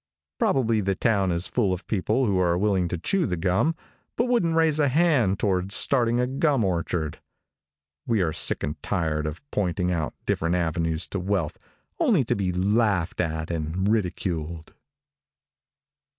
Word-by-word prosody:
Probably 115 -5 +2
the 95 -1 0
town 100 -4 +1
is 85 +2 0
full 105 -6 0
of 90 0 -4
people 110 +5 0
who 100 -4 +1
are 85 -1 +2
willing 95 -2 +1
to 90 - -3
chew 185 - 0
the 90 -3 -2
gum, 95 - +1 0.4
but 235 - +1
wouldn't 230 -10 +1
raise 160 -2 +3
a 145 - +4
hand 135 - +2
toward 95 -2 0
starting 120 0 +3
a 125 - +2
gum 135 -1 +1
orchard. 85 -4 -2 0.9
We 110 -5 +2
are 80 -3 -1
sick - - +1
and 75 0 -4
tired 80 -5 -1
of 75 - -6
pointing 90 -2 0
out 80 -4 -2
different 85 +2 0
avenues 80 -1 -1
to 100 - -3
wealth 90 -4 -2 0.4
only - - +3
to - - -1
be 95 -2 -1
laughed 95 -1 +1
at 80 -1 -3
and 85 +4 -2
ridiculed. 85 -6 -2
95 Hz, 160 wpm, -25 LUFS, 85-115 Hz, 0.9 s, a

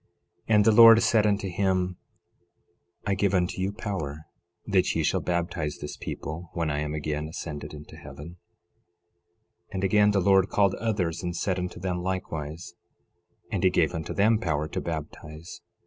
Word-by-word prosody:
11:21 110 - +5
And 105 -1 +5
the 110 - +6
Lord 115 +1 +8
said 110 -2 +3
unto 100 -1 0
him: 90 -1 0 1.1
I 100 - +1
give 100 0 +1
unto 90 0 0
you 95 +1 0
power 80 -8 -5 0.4
that 95 -3 +1
ye 80 - +1
shall - - +1
baptize 85 -4 -2
this 75 - -7
people 80 +2 -6
when 85 -3 -1
I 75 - -1
am 75 0 -3
again 75 0 -3
ascended 80 -2 -6
into 75 0 -11
heaven. 85 +5 -11 1.3
11:22 - - -19
And 95 0 -3
again 105 +2 +4
the 100 -1 +2
Lord 95 0 +4
called 100 -2 +2
others, 90 -7 -1
and 90 -1 -4
said 95 +1 -1
unto 90 -1 -5
them 90 -1 -2
likewise; 85 -3 -4 0.8
and - - -2
he - - +6
gave - - +1
unto 80 0 -5
them 110 +2 +3
power 75 -5 -1
to - - -3
baptize. 80 0 -7
90 Hz, 170 wpm, -26 LUFS, 80-100 Hz, 1.3 s, Lord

